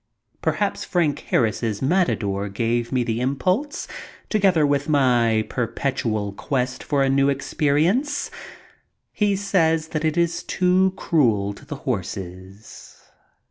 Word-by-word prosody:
Perhaps 160 +6 -1
Frank 165 -5 0
Harris's 110 -2 +1
"Matador" 110 - 0
gave 115 +3 -1
me 130 -2 +1
the 115 0 -2
impulse, 185 - -1 0.4
together 190 -7 +3
with 145 +1 0
my 120 -6 +3
per 125 -2 -1
petual 110 -5 -2
quest 130 -1 -2
far 140 -2 +1
a - - +2
new 140 +1 +3
experience. 155 - 0 0.8
He 205 -2 +1
says 165 -5 +1
it 155 +1 0
is 170 -1 +1
too 185 +1 +2
cruel 110 -11 +1
to - - -15
the 150 - -5
horses. 95 - -6
140 Hz, 120 wpm, -23 LUFS, 115-170 Hz, 0.8 s, together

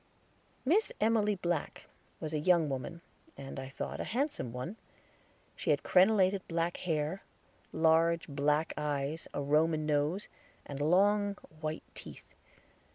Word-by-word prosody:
Miss 380 +11 +3
Emily 215 -1 +3
Black 175 -4 -2 0.3
was 155 0 -5
a 155 - +1
young 170 -1 +3
woman, 135 +5 -4 0.4
and, 135 0 -7
I 130 0 -6
thought, 135 - -5
a - - -1
handsome 260 - -2
one. 125 - -5 0.8
She - - -4
had - - +3
crenelated 190 0 +4
black 165 +1 -1
hair, 160 +1 -1 0.5
large 165 +1 +3
black 150 +2 +1
eyes, 150 +1 -2
a 145 - -3
Roman 155 +2 +2
nose, 150 +6 0 0.4
and 140 -1 -6
long 200 +6 +3 0.2
white 155 0 -3
teeth. - - -11
160 Hz, 130 wpm, -32 LUFS, 150-190 Hz, 0.8 s, crenelated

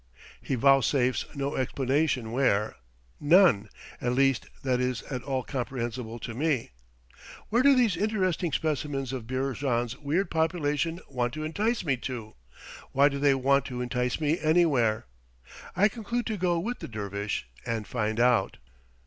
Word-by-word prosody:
He 135 - -2
vouchsafes 130 -1 +3
no 140 +1 -2
explanation 130 -1 0
where; 115 -5 +1 0.4
none, 145 - +5 0.3
at 120 0 0
least, 135 -1 +2 0.2
that 130 -2 +1
is 125 -1 -1
at 125 -2 -3
all 130 -1 -2
comprehensible 120 -2 -4
to 115 - -5
me. 140 - -1 0.8
Where 235 +3 +3
do 280 +1 +6
these 235 -7 +3
interesting 185 -4 0
specimens 140 -4 -2
of 120 -4 -5
Beerjand's 130 -2 -1
weird 165 +6 -1
population 160 0 0
want 125 -1 -2
to 155 - -4
entice 210 +9 -1
me 135 -4 +1
to? 120 -3 -6 0.6
why 140 +2 +5
do 140 0 -4
they 140 -1 +4
want 140 +1 +2
to 125 -1 -5
entice 125 0 -1
me 155 +2 +1
anywhere? 150 - +2 0.7
I 200 +4 +5
conclude 235 +2 -3
to 220 - -2
go 175 -2 +1
with 230 +9 -3
the - - -6
dervish 100 - -4 0.2
and 115 -2 -3
find 110 -1 -2
out. 125 -1 +3
135 Hz, 150 wpm, -28 LUFS, 125-160 Hz, 0.8 s, do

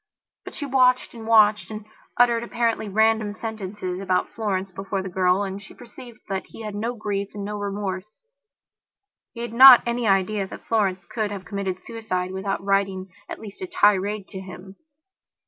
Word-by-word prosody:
But - - -9
she 290 - -4
watched 255 -2 +3
and 225 -2 -9
watched, 210 -4 +4
and 215 -1 -7 0.3
uttered 240 -1 +4
apparently 230 -2 -1
random 220 0 +2
sentences 200 -5 -5
about 185 -2 0
Florence 195 -3 -3
before 195 +1 -4
the 190 - -5
girl, 185 +2 +2
and 195 0 -5
she 195 - -14
perceived 240 -1 -13
that 195 -2 -4
he 225 - -11
had 210 -1 -5
no 230 +4 -3
grief 205 -2 -4
and 200 -1 -5
no 210 +1 -4
remorse. 200 0 -5 1.1
He 235 - -7
had 235 -1 -5
not 255 +1 +10
any 235 -1 -1
idea 195 +1 +1
that - - -11
Florence 195 -5 0
could 215 +3 -3
have 200 -2 -7
committed 195 -2 -4
suicide 185 -5 -4
without 190 +1 -3
writing 195 -1 0 0.2
at - - -5
least 210 - -11
a 370 - -4
tirade 205 - +2
to 190 - -7
him. 190 +1 -11
205 Hz, 175 wpm, -23 LUFS, 190-225 Hz, 1.1 s, not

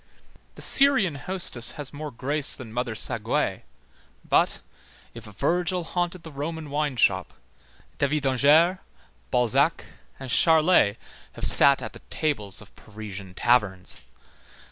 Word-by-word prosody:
The - - -7
Syrian 265 - +4
hostess 140 -6 +1
has 145 -2 -5
more 150 +1 -6
grace 140 +3 0
than 115 -4 -10
Mother 120 -1 -3
Saguet, 115 -2 -1 0.7
but, - - +2 0.5
if 115 -1 -11
Virgil 175 - -1
haunted 175 +1 -3
the 160 - -10
Roman 150 +1 -6
wine 145 -2 -1
shop, 115 - +1 0.6
David 145 +1 0
d'Angers, 150 +7 +3 0.5
Balzac 130 +6 +1 0.3
and 130 -2 -6
Charlet 160 - +4 0.4
have - - -5
sat 140 -1 +5
at - - -7
the - - -13
tables 110 -11 -1
of 100 - -21
Parisian 100 -3 -10
taverns. 100 -7 0
140 Hz, 120 wpm, -25 LUFS, 115-160 Hz, 0.7 s, sat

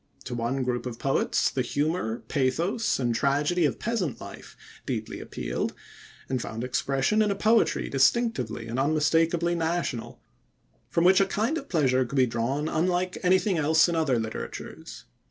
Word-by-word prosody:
To 125 - -6
one 120 +3 -1
group 125 -1 -2
of 120 -2 -6
poets 135 +2 +1
the 130 - -1
humor, 145 -3 -1
pathos, 165 - 0
and 120 -3 0
tragedy 145 +7 +1
of 145 - 0
peasant 210 - -2
life - - -11 0.3
deeply - - -4
appealed, - - -4 0.5
and 130 -2 -1
found 115 +1 -5
expression 135 - +1
in 210 - +2
a 200 - 0
poetry 220 +3 +2
distinctively 135 - +1
and 115 +3 -3
unmistakably 165 +4 +2
national, 165 -7 -2 0.7
from 170 - +1
which 185 +2 +6
a 195 - +3
kind 220 +10 0
of 275 - -13
pleasure 130 -6 +2
could 125 +3 -6
be 130 - +5
drawn 125 +6 -1
unlike 180 +3 0
anything 185 0 +2
else 160 +2 +4
in 170 - -1
other 155 -6 +2
literatures. 110 -1 -6
150 Hz, 155 wpm, -26 LUFS, 125-175 Hz, 0.7 s, which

